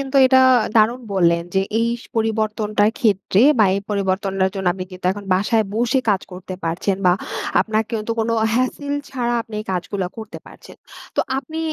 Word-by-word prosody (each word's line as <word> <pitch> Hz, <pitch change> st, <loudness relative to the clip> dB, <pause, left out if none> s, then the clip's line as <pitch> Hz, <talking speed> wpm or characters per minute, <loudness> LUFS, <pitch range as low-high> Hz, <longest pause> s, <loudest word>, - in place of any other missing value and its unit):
কিন্তু 275 Hz, 0 st, -2 dB
এটা 260 Hz, 0 st, +5 dB, 0.4 s
দারুণ 225 Hz, +3 st, +3 dB
বললেন। 170 Hz, -2 st, +3 dB
যে 190 Hz, -, +3 dB, 0.2 s
এই 230 Hz, 0 st, +1 dB
স -, -, -15 dB
পরিবর্তনটার 215 Hz, -1 st, +1 dB
ক্ষেত্রে, 200 Hz, -4 st, +2 dB, 0.2 s
বা 215 Hz, -, +6 dB
এই 200 Hz, -, -1 dB
পরিবর্তনটার 195 Hz, -1 st, 0 dB
জন্য 190 Hz, -1 st, -4 dB
আপনি 185 Hz, 0 st, -6 dB
কিন্তু 185 Hz, 0 st, -12 dB
এখন 205 Hz, +1 st, -9 dB
বাসায় 215 Hz, +4 st, +1 dB
বসে 240 Hz, +4 st, +1 dB
কাজ 195 Hz, -2 st, +1 dB
করতে 185 Hz, +1 st, -7 dB
পারছেন, 170 Hz, +4 st, -1 dB
বা 180 Hz, -, +6 dB, 0.5 s
আপনার 220 Hz, 0 st, 0 dB
কিন্তু 225 Hz, 0 st, -2 dB
কোনো 225 Hz, +1 st, 0 dB, 0.2 s
হ্যাসেল 270 Hz, +3 st, -1 dB, 0.2 s
ছাড়া, 240 Hz, -3 st, -1 dB
আপনি 225 Hz, -, -12 dB
এই -, -, -8 dB
কাজগুলা 185 Hz, +1 st, -3 dB
করতে 220 Hz, -1 st, -8 dB
পারছেন। -, -, -14 dB, 0.4 s
তো -, -, +4 dB, 0.2 s
আপনি 315 Hz, +3 st, -7 dB
215 Hz, 175 wpm, -20 LUFS, 190-230 Hz, 0.5 s, বা